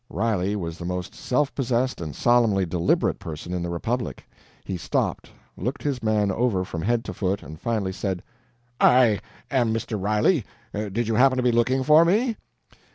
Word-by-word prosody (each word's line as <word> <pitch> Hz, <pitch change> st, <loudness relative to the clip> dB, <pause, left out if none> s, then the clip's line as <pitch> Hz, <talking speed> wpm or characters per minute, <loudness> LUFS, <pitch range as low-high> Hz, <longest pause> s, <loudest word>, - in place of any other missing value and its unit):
Riley 105 Hz, -2 st, 0 dB
was 85 Hz, -4 st, -5 dB
the 85 Hz, -, -6 dB
most 90 Hz, 0 st, -4 dB
self 140 Hz, +2 st, 0 dB
possessed 130 Hz, -4 st, 0 dB
and 75 Hz, -4 st, -5 dB
solemnly 115 Hz, -6 st, +3 dB
deliberate 85 Hz, 0 st, +1 dB
person 80 Hz, +2 st, -6 dB
in 90 Hz, -, -2 dB
the 85 Hz, -, -3 dB
republic. 115 Hz, +8 st, -3 dB, 0.4 s
He 95 Hz, -, -3 dB
stopped, 90 Hz, -, -2 dB, 0.3 s
looked 125 Hz, +9 st, -4 dB
his 140 Hz, -4 st, -1 dB
man 105 Hz, -2 st, +1 dB
over 100 Hz, -3 st, 0 dB
from 85 Hz, -2 st, -5 dB
head 115 Hz, +5 st, 0 dB
to -, -, -5 dB
foot, 95 Hz, 0 st, -1 dB
and 80 Hz, +3 st, -10 dB
finally 105 Hz, -5 st, -1 dB
said: 95 Hz, -2 st, -3 dB, 0.6 s
"I 125 Hz, -5 st, +5 dB, 0.3 s
am 125 Hz, -5 st, +2 dB
Mr. 110 Hz, -2 st, -2 dB
Riley. 110 Hz, -, +2 dB, 0.3 s
Did 105 Hz, +2 st, -2 dB
you 115 Hz, -, 0 dB
happen 130 Hz, +3 st, +4 dB
to 125 Hz, -, +1 dB
be 125 Hz, -, +3 dB
looking 125 Hz, +3 st, +2 dB
for 155 Hz, +3 st, +7 dB
me?" 220 Hz, +7 st, +2 dB
110 Hz, 175 wpm, -24 LUFS, 95-125 Hz, 0.6 s, for